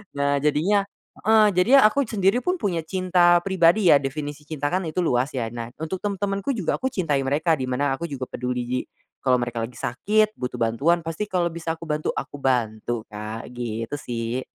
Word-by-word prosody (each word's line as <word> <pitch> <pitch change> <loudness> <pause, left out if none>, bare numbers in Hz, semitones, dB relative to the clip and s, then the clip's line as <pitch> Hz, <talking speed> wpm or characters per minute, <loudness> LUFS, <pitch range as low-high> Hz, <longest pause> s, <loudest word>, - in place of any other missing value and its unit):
Nah, 140 0 +1
jadinya 155 +8 +2 0.4
heeh, 220 0 +5
jadinya 220 +10 +5
aku 245 +5 +3
sendiri 200 +1 +2
pun 360 +7 0
punya 195 - -1
cinta 180 -2 +3
pribadi 185 +1 +4
ya, 145 - +7
definisi 145 +1 -5
cinta 145 -2 -2
kan 185 -1 -1
itu 155 - -7
luas 125 -4 +1
ya 115 -3 -2
nah 115 -1 -5
untuk 160 +4 -4
tem 205 0 -2
temanku 200 +6 -2
juga 195 -8 -1
aku 260 - 0
cintai 165 - 0
mereka 145 +5 +1
di 130 - -2
mana 135 +2 0
aku 170 +5 -5
juga 140 -4 -5
peduli, 125 0 -3 0.3
kalau 130 -1 +3
mereka 120 -1 -3
lagi 125 - -16
sakit 215 - +1
butuh 125 0 -3
bantuan 140 +10 +1
pasti 165 +6 -4
kalo 175 -3 0
bisa 165 0 -3
aku 165 - -12
bantu, 155 -1 -2
aku 135 - -5
bantu 120 -3 -1
Kak, 110 +3 -6
gitu 115 +1 -4
sih. 120 0 -3
155 Hz, 190 wpm, -24 LUFS, 125-185 Hz, 0.4 s, ya